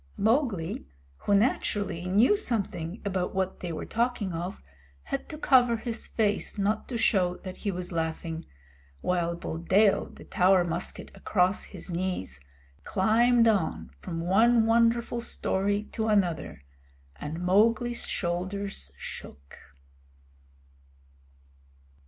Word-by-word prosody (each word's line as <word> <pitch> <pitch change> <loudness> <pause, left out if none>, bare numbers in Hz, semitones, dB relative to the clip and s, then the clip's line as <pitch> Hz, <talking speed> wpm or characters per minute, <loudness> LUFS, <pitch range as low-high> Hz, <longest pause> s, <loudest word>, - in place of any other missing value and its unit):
Mowgli, 210 - 0 0.3
who 200 - +1
naturally 200 -4 0
knew 210 - +5
something 200 - -2
about 185 -1 -2
what 190 0 -1
they 175 - -4
were 155 - -5
talking 230 -5 -1
of, 175 +3 -4 0.4
had 275 - -4
to 305 - -6
cover 250 -5 +4
his 235 0 -4
face 210 -1 0
not 205 +2 0
to 245 - -3
show 180 -5 +2
that 185 -1 -7
he 205 - -3
was 180 -1 -3
laughing, 160 0 -3 0.5
while 170 -1 0
Buldeo, 185 +5 +2
the - - -13
Tower 185 0 +3
musket 170 +1 -3
across 185 -1 +1
his - - -7
knees, 170 - -3 0.4
climbed 230 - +3
on 160 - 0
from 165 - -5
one 220 +6 +4
wonderful 235 +1 +2
story 205 -2 0
to 220 -1 -2
another, 180 - 0 0.5
and 155 +3 -5
Mowgli's 220 +6 +2
shoulders 185 - -3
shook. 70 0 -9
195 Hz, 115 wpm, -28 LUFS, 175-225 Hz, 0.5 s, knew